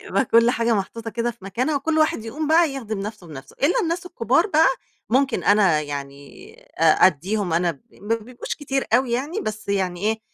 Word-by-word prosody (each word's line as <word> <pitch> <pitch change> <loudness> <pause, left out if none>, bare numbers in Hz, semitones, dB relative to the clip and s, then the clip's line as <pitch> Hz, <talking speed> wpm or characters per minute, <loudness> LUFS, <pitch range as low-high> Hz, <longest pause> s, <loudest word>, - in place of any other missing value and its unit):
يبقى 270 - 0
كلّ 230 +1 +4
حاجة 230 -1 +1
محطوطة 225 +3 -4
كده 235 +2 -1
في 230 -5 -16
مكانها 250 +10 -1
وكلّ 315 +3 0
واحد 310 -8 +1
يقوم 290 +7 -4
بقى 325 0 +4
يِخدم 220 -6 -5
نفْسه 210 -2 -7
بنفْسه، 135 -4 -11
الّا 295 +6 +3
الناس 335 +1 -2
الكبار 275 - +1
بقى، 320 -5 +4 0.4
ممكن 265 +1 +1
أنا 195 -7 +4
يعني 140 -1 -8 0.3
أ - - -2 0.2
أدّيهم 185 +3 -1
أنا 170 +1 +2
ب 140 -5 -12
ما 210 +3 -2
بيبقوش 235 +2 -6
كتير 270 -2 -2
أوي 250 0 +2
يعني، 290 - -2
بس 215 -1 -6
يعني 185 -3 -1
إيه، 220 +2 0
225 Hz, 190 wpm, -22 LUFS, 195-270 Hz, 0.4 s, كلّ